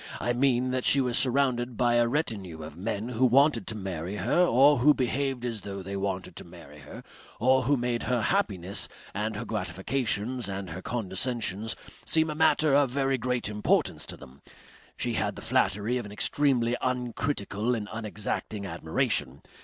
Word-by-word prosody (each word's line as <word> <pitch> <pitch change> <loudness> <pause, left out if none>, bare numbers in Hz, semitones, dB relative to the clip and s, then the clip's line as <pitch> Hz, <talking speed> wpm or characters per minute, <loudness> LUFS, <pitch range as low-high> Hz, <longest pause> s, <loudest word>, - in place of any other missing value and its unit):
I 120 - 0
mean 125 0 +2
that 130 0 -1
she 140 - +5
was 125 -3 +1
surrounded 125 -3 +2
by 120 -1 +3
a 120 0 +4
retinue 100 - -3
of 75 -1 -9
men 105 +5 -3
who 125 +1 -1
wanted 130 -3 +4
to 110 - -4
marry 95 -2 -4
her 115 - +2
or 140 -1 +5
who 145 +4 +5
behaved 130 0 -1
as 115 -4 -3
though 100 0 -6
they 100 +2 -5
wanted 95 -1 -3
to - - -6
marry 75 +1 -13
her 75 - -11 0.4
or 130 +3 +4
who 140 +2 +3
made 120 -1 -1
her 125 -3 +1
happiness 100 - 0 0.2
and 105 +2 -2
her 110 +2 -4
gratifications 110 +4 -2
and 95 -2 -5
her 90 +3 -6
condescensions 110 0 -3 0.3
seem 160 -1 +3
a - - -3
matter 155 -2 +3
of 140 -1 +4
very 135 0 0
great 125 -1 -1
importance 105 0 0
to - - -8
them. 65 +2 -15 0.6
She - - -1
had - - -1
the - - -8
flattery 105 +7 +1
of 115 - -6
an - - -11
extremely 120 +1 +2
uncritical 125 -3 -1
and 105 -2 -4
unexacting 105 -1 -4
admiration. 80 -5 -1
120 Hz, 175 wpm, -28 LUFS, 100-130 Hz, 0.6 s, she